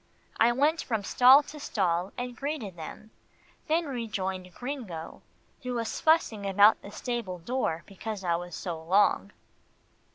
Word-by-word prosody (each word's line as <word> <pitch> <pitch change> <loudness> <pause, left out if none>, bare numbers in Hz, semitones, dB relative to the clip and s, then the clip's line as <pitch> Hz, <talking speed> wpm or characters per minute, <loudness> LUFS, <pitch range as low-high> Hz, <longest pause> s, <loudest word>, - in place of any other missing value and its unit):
I 235 - +5
went 295 +6 +2
from 220 -5 -2
stall 255 +7 +7
to 300 +1 -10
stall 185 -7 0
and 245 0 -4
greeted 270 - -4
them, 175 +6 -9 0.6
then 325 +2 +1
rejoined 190 -8 -4
Gringo, 235 - -6 0.4
who 250 -1 -4
was 230 -1 -3
fussing 315 -10 +3
about 200 +2 +5
the - - -10
stable 230 -4 -4
door 170 -3 -2
because 205 0 -6
I 170 -2 +1
was 175 0 -5
so 170 -4 -5
long. 195 +3 +2
215 Hz, 140 wpm, -28 LUFS, 185-250 Hz, 0.6 s, stall